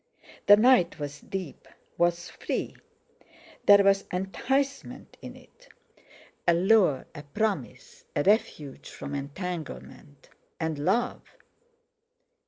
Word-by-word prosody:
The 205 - +9
night 240 -4 +4
was 145 -1 -6
deep, 185 -6 -7 0.3
was 175 0 0
free—there 200 0 -1
was 195 0 +3
enticement 270 +9 -2
in - - -9
it; - - -20 0.8
a 170 - +5
lure, 185 -6 +3
a 150 - -8
promise, 220 - -4
a - - +1
refuge 185 - 0
from 140 - -8
entanglement, 145 -1 -7 0.3
and 160 -2 -2
love! 205 +11 0
185 Hz, 95 wpm, -27 LUFS, 155-220 Hz, 0.8 s, The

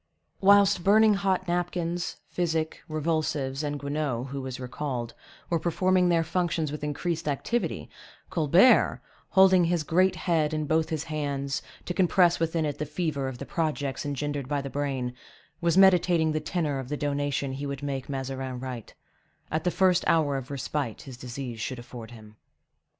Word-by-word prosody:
Whilst 200 -2 +5
burning 215 +2 +6
hot 190 -2 0
napkins, 175 0 -2
physic, 160 -2 -2
revulsives, 155 -3 -1
and 145 -1 -2
Guenaud, 140 -3 -2
who 140 0 -4
was 130 -1 -6
recalled, 125 -2 -4 0.3
were 170 - 0
performing 180 +2 +2
their 165 -1 +3
functions 165 -2 -1
with 150 0 -6
increased 160 +2 -2
activity, 190 - -1 0.4
Colbert, 170 - +5 0.3
holding 190 -2 +6
his 170 -1 +1
great 185 +4 +3
head 155 -4 0
in 155 -1 -1
both 160 +1 +1
his 155 -3 -2
hands, 140 -3 -2 0.2
to 180 - -2
compress 180 -1 +3
within 165 -1 0
it 145 -2 -3
the 150 - -1
fever 150 -3 -2
of 130 -2 -5
the - - -7
projects 150 -4 -2
engendered 145 -1 -3
by 145 0 0
the 135 -1 -5
brain, 135 -4 -2 0.5
was 170 0 +2
meditating 180 -4 +5
the 155 - 0
tenor 155 -3 -2
of 130 -1 -7
the 150 - -2
donation 145 -1 -1
he 140 +2 -4
would 140 0 -5
make 135 -2 -3
Mazarin 135 -2 -4
write, 125 -3 -7 0.6
at 155 +2 -1
the - - +4
first 185 0 +3
hour 150 -4 +3
of 135 -1 -5
respite 140 -3 -3
his 130 -3 -9
disease 125 -1 -6
should 130 +2 -3
afford 120 -2 -9
him. 110 -2 -14
150 Hz, 165 wpm, -27 LUFS, 135-175 Hz, 0.6 s, burning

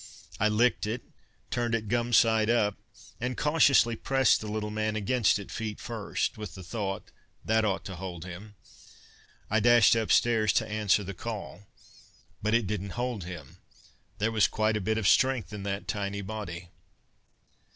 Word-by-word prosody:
I 105 - +3
licked 110 +1 +2
it, 115 +3 -3 0.5
turned 120 -1 0
it 110 -1 -3
gum 120 +2 0
side 110 -1 +4
up, 105 -4 +2 0.4
and 125 +1 -3
cautiously 145 -6 +4
pressed 135 +2 +2
the 110 - -6
little 105 0 -3
man 110 0 -1
against 110 +2 +2
it 100 -4 -9
feet 110 +3 -4
first. 110 -1 -3
With 105 -5 -7
the 95 - -9
thought, 100 +1 -4 0.3
"That 110 0 +2
ought 95 -2 -1
to 95 -3 -6
hold 90 -1 -7
him," 95 +4 -10 0.9
I 110 - +2
dashed 120 0 +6
upstairs 110 -1 +3
to - - +1
answer 105 -1 +1
the 100 +1 -6
call._ 105 0 -6 0.8
_But 110 +2 +2
it 120 - -3
didn't 100 +1 -4
hold 120 -6 -2
him. 85 -7 -9 0.6
There 110 +3 0
was 110 -2 +4
quite 110 0 0
a 105 - -1
bit 110 +3 0
of 110 -3 0
strength 130 -3 +3
in 105 - -6
that 100 +1 -4
tiny 100 -1 -3
body. 95 -4 -6
110 Hz, 165 wpm, -28 LUFS, 100-115 Hz, 0.9 s, dashed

